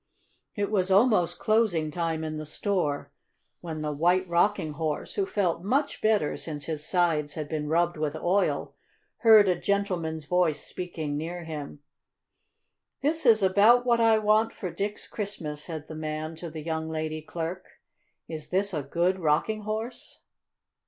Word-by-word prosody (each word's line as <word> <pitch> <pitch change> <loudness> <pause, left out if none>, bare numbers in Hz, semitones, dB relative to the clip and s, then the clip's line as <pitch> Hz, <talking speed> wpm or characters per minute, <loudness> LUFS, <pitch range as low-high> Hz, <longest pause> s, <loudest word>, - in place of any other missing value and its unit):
It 205 -1 -1
was 190 -3 +1
almost 190 -4 +4
closing 210 -9 +1
time 165 -1 -2
in 155 0 -4
the 155 - -5
store 155 -4 -1 0.5
when 160 -3 -6
the 150 - -1
White 175 +5 +2
Rocking 175 -1 +2
Horse, 155 0 -3
who 395 -2 -1
felt 185 - 0
much 275 +9 0
better 215 -8 +2
since 150 -3 -5
his 155 -2 -4
sides 155 -4 +1
had 155 -2 -4
been 150 -1 -3
rubbed 170 +2 +1
with 155 0 -2
oil, 185 +5 0 0.4
heard 220 -3 +7
a 180 - +3
gentleman's 175 -5 -1
voice 170 -3 +1
speaking 160 -5 -4
near 170 +3 -4
him. 150 -2 -7 1.2
"This 305 -1 +1
is 220 -3 +6
about 210 +6 +5
what 235 -1 +3
I 225 -1 +5
want 215 +1 +2
for 185 -4 -5
Dick's 205 +3 -4
Christmas," 160 -8 -5
said 155 -3 -6
the - - -8
man 155 +1 -4
to 170 +1 -6
the 155 -1 -7
young 160 0 -3
lady 155 0 -3
clerk. 170 +3 -5 0.6
"Is 155 -2 -7
this 195 +2 0
a 150 - -1
good 170 +7 0
Rocking 170 +7 +1
Horse?" 220 +3 -5
175 Hz, 160 wpm, -27 LUFS, 155-205 Hz, 1.2 s, heard